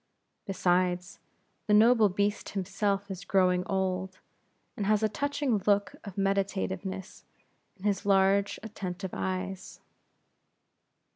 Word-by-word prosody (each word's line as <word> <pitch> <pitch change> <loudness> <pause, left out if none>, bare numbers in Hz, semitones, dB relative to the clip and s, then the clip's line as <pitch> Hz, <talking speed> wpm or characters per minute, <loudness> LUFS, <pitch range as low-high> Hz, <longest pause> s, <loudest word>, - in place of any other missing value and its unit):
Besides, 180 -1 0 0.5
the 210 - +5
noble 225 0 +6
beast 205 +2 -1
himself 195 +1 -1
is 190 0 -6
growing 180 -2 +2
old, 190 -1 -1 0.6
and 200 - -2
has 215 0 +3
a - - +5
touching 285 0 0
look 205 -1 +2
of 200 -3 -8
meditativeness 195 -1 -2 0.5
in 185 - -17
his 205 -2 0
large, 195 0 +3
attentive 190 -4 -5
eyes. 95 0 -4
195 Hz, 110 wpm, -29 LUFS, 185-205 Hz, 0.6 s, noble